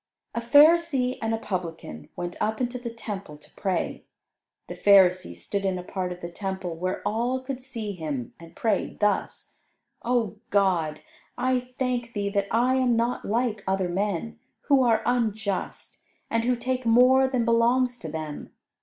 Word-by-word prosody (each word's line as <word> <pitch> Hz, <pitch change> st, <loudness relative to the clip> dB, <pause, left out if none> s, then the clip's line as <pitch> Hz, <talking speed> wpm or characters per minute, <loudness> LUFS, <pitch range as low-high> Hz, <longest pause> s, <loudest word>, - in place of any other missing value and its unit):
A 235 Hz, -, -2 dB
Pharisee 285 Hz, 0 st, +4 dB
and 225 Hz, 0 st, -1 dB
a 225 Hz, -, +1 dB
Publican 165 Hz, -, -5 dB
went 175 Hz, 0 st, -4 dB
up 220 Hz, +1 st, 0 dB
into 250 Hz, 0 st, -2 dB
the 240 Hz, -1 st, -5 dB
Temple 200 Hz, -8 st, -7 dB
to 150 Hz, -, -19 dB
pray. 190 Hz, -3 st, -2 dB, 0.6 s
The -, -, -6 dB
Pharisee 185 Hz, -, +4 dB
stood 195 Hz, -, -4 dB
in 190 Hz, -1 st, 0 dB
a 180 Hz, -, -6 dB
part 180 Hz, 0 st, -3 dB
of 180 Hz, 0 st, -7 dB
the 170 Hz, -, -6 dB
Temple 190 Hz, -2 st, -4 dB
where 185 Hz, +3 st, -3 dB
all 240 Hz, +4 st, 0 dB
could 260 Hz, 0 st, -6 dB
see 235 Hz, -5 st, -5 dB
him, 150 Hz, -9 st, -5 dB
and 165 Hz, 0 st, -14 dB
prayed 215 Hz, -4 st, -1 dB
thus: 210 Hz, 0 st, -1 dB, 0.4 s
"O 230 Hz, -4 st, 0 dB
God, 175 Hz, -6 st, +1 dB, 0.4 s
I 255 Hz, 0 st, +2 dB, 0.2 s
thank 245 Hz, -2 st, -1 dB
Thee 200 Hz, -1 st, -1 dB
that 200 Hz, -1 st, 0 dB
I 250 Hz, +3 st, +2 dB
am 250 Hz, -2 st, +3 dB
not 235 Hz, +2 st, 0 dB
like 225 Hz, -1 st, 0 dB
other 190 Hz, -1 st, 0 dB
men, 200 Hz, +4 st, -2 dB, 0.2 s
who 275 Hz, -2 st, +4 dB
are 230 Hz, -3 st, +3 dB
unjust, 220 Hz, -5 st, -2 dB, 0.3 s
and 230 Hz, 0 st, +1 dB
who 250 Hz, 0 st, +2 dB
take 255 Hz, +1 st, -2 dB
more 250 Hz, +3 st, +5 dB
than 255 Hz, -3 st, 0 dB
belongs 240 Hz, +2 st, +2 dB
to 160 Hz, -, -6 dB
them. 155 Hz, -1 st, -6 dB
220 Hz, 165 wpm, -26 LUFS, 185-245 Hz, 0.6 s, more